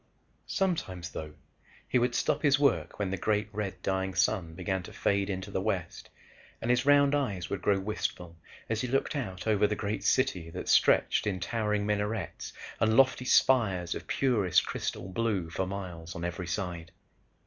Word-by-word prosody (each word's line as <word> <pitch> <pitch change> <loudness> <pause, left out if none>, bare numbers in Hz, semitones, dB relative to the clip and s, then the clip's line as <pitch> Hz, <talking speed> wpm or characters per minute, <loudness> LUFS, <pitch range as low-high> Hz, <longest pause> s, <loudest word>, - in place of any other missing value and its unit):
Sometimes, 95 - -1
though, 75 -1 -7 0.5
he 125 - +2
would 120 0 +1
stop 150 -1 +1
his 145 -2 +4
work 90 - +1
when 100 -3 -2
the 95 - -1
great 105 +1 0
red 105 -2 -3
dying 95 -1 -1
sun 90 -3 +1
began 95 +1 -2
to 90 - -10
fade 100 0 0
into 95 -1 -4
the 95 - -1
west 95 -5 -3 0.5
and 120 - 0
his 125 +3 +1
round 145 0 +6
eyes 100 -11 -1
would 100 - -2
grow 100 -1 +2
wistful 95 -4 -4 0.3
as 110 -1 -1
he 125 - -2
looked 135 +4 0
out 95 -10 -4
over 105 -2 +3
the 105 - -1
great 100 -1 -3
city 105 -9 +1
that - - -6
stretched - - +4
in 95 -3 -1
towering 105 +1 -1
minarets 105 -2 -2 0.3
and 110 0 +3
lofty 130 -1 +4
spires 100 -11 +3
of - - -7
purest 110 -10 +2
crystal - - -4
blue 95 -4 -1
for 95 +3 -2
miles 90 -4 -6
on 85 - -4
every 90 0 -4
side. 85 -2 -4
100 Hz, 175 wpm, -29 LUFS, 90-115 Hz, 0.5 s, round